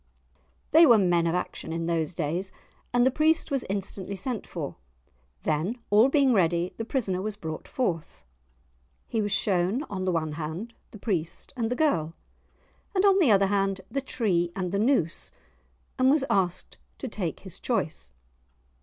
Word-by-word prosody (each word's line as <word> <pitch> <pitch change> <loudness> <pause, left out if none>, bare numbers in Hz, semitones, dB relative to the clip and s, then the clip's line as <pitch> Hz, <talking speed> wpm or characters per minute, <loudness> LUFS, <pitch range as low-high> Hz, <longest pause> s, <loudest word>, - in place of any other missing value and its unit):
They 325 +1 +8
were 235 -3 +8
men 175 -4 +3
of 165 - +1
action 180 -2 -3
in 165 0 -2
those 165 0 -1
days, 175 +4 -2 0.4
and 245 0 +4
the 260 - +4
priest 315 +3 +2
was 275 -2 0
instantly 195 0 -4
sent 225 +3 -4
for. 155 -5 -5 0.7
Then, 160 +10 0
all 215 +5 +6
being 275 -3 +4
ready, 175 -2 +2
the 225 - -3
prisoner 205 -8 -1
was 210 +1 -3
brought 160 -6 -6
forth. 175 - -3 0.8
He 225 - -1
was 205 -1 -1
shown 195 +6 +1
on 185 -2 -3
the 185 - +2
one 160 -3 -1
hand 165 +9 -5 0.2
the - - -11
priest 175 -6 -3
and 230 -3 -1
the 250 - -1
girl, 170 - +1 0.8
and 380 +1 +3
on 395 -1 +5
the 325 -9 +4
other 200 -2 +5
hand 195 -1 0
the 275 - -1
tree 185 -10 0
and 185 -2 -2
the 200 - 0
noose, 215 - +1 0.7
and 255 0 +5
was 280 -1 +3
asked 185 -2 0 0.2
to 265 - -5
take 195 -7 -4
his 190 -4 -9
choice. 155 - -2
195 Hz, 170 wpm, -27 LUFS, 170-245 Hz, 0.8 s, They